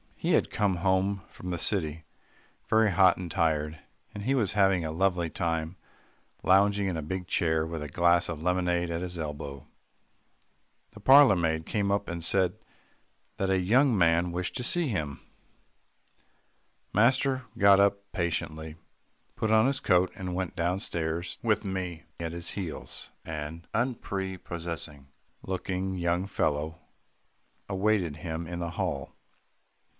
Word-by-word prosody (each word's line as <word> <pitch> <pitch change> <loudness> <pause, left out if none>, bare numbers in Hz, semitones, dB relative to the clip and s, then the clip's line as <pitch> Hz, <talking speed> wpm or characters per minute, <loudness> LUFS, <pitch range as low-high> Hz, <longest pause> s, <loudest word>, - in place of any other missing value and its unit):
He - - -1
had - - +2
come 100 -3 +1
home 95 +1 +1
from 90 - -8
the 90 - -2
city 80 -5 0 0.6
very 110 -1 +4
hot 95 -1 +5
and 90 -2 -5
tired, 80 -2 0 0.3
and 100 - -6
he 130 +5 +1
was 110 -7 +1
having 95 -4 +3
a 80 - -2
lovely 90 0 +1
time 80 0 -2 0.7
lounging 100 +1 +4
in 90 -3 -1
a - - -2
big 90 +4 -4
chair 80 -2 +1
with 80 -1 -5
a 75 - -4
glass 85 +3 +3
of 80 -3 -4
lemonade 90 0 +1
at 85 +1 -2
his 90 -1 -4
elbow. 75 -3 -6 1.2
The 105 - -13
parlour 135 0 +7
maid 80 -2 0
came 100 -2 0
up 100 0 0
and 85 -1 -5
said 90 +1 +1 0.8
that 95 - 0
a 95 -1 +3
young 120 +7 +4
man 85 0 +3
wished 90 +1 -3
to 125 - -2
see 170 +6 +1
him. 75 - -3 1.7
Master 130 +4 +3
got 100 -2 +6
up 100 0 +2
patiently, 80 -3 -3 0.6
put 110 - -1
on 110 +1 +5
his 135 -1 0
coat, 90 -1 +3
and 90 -1 -4
went 95 -1 -3
down 90 +3 0
stairs 85 -2 -3
with 105 -3 +1
me 90 -3 -4 0.2
at 85 -1 -3
his 85 0 -5
heels. 90 -6 -6 0.2
An 80 +1 -6
unprepossessing 85 - -3 0.4
looking 95 0 -3
young 85 +1 0
fellow 80 -3 -1 0.9
awaited 95 -5 +1
him 80 +1 -4
in 85 0 -5
the 85 -1 -3
hall. 85 -7 -3
90 Hz, 145 wpm, -28 LUFS, 80-100 Hz, 1.7 s, parlour